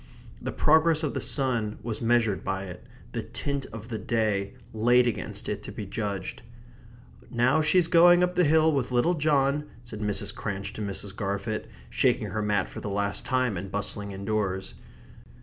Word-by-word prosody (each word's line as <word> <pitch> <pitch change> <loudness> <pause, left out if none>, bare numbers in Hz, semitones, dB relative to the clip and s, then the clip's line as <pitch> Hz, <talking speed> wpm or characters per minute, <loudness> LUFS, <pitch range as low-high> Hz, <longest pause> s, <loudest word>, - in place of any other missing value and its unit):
The - - -3
progress 160 +1 +4
of 150 - -1
the - - -2
sun 120 -6 0
was 110 -2 -3
measured 115 -3 +2
by 95 0 -2
it; 90 -2 -9 0.3
the - - -3
tint 140 -1 -4
of 115 +1 -9
the 110 -2 -3
day 105 -3 0 0.2
laid 120 +3 +4
against 120 -4 -3
it - - -3
to - - -8
be 105 - -6
judged. 100 -1 -4 0.9
"Now 130 +6 +3
she's 165 +3 +4
going 175 +1 +7
up 180 0 +1
the 180 0 +3
hill 160 +1 +5
with 135 -4 0
little 125 +8 +3
John," 145 -2 +2 0.2
said 120 -3 -7
Mrs. 105 -1 0
Cranch 100 0 -4
to 110 - -6
Mrs. 100 -1 -4
Garfit, 100 +1 -3 0.2
shaking - - +2
her 110 - -2
mat 105 -1 +1
for - - -8
the 105 - -4
last 100 0 -1
time, 130 -4 +1
and 95 +2 -6
bustling 100 0 -3
indoors. 100 -1 -2
110 Hz, 175 wpm, -27 LUFS, 100-140 Hz, 0.9 s, going